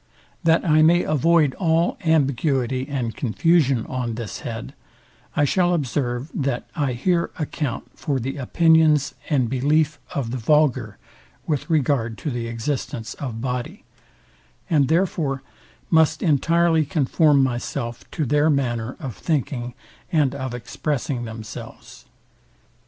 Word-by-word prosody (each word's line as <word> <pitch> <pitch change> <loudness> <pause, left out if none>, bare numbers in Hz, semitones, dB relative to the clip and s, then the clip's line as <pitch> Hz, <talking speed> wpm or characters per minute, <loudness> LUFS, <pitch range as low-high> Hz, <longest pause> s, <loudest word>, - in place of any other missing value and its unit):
That 165 +1 +3
I 155 0 +5
may 170 +3 +5
avoid 155 -1 +3
all 165 -1 +2
ambiguity 135 -4 +1
and 125 -5 -2
confusion 135 - +2
on 125 -3 -3
this 115 -3 -6
head, 115 -1 -6 0.6
I 145 - +3
shall 175 +4 +2
observe, 130 -1 -2
that 135 -4 -2
I 145 -6 0
here 170 +8 +1
account 150 -5 -3
for 140 -4 -1
the 135 +4 -4
opinions 155 +1 +3 0.2
and 135 -6 +2
belief 145 +4 +1 0.2
of 125 -5 -2
the 130 - -3
vulgar 130 -4 +2 0.5
with 150 +1 -2
regard 130 -7 +1
to 150 - -4
the 120 -2 -3
existence 115 0 -4
of 115 -5 -5
body; 130 - -4 0.9
and 145 -4 +4
therefore 160 -5 0 0.5
must 160 -1 +3
entirely 165 +1 +3
conform 150 -1 +3
myself 120 -1 -3
to 155 - -2
their 150 +4 +3
manner 125 -4 -1
of 130 -7 -6
thinking 125 -6 -2 0.4
and 145 -5 +2
of 130 -3 -4
expressing 130 +1 -3
themselves. 110 -1 -9
140 Hz, 125 wpm, -22 LUFS, 125-160 Hz, 0.9 s, I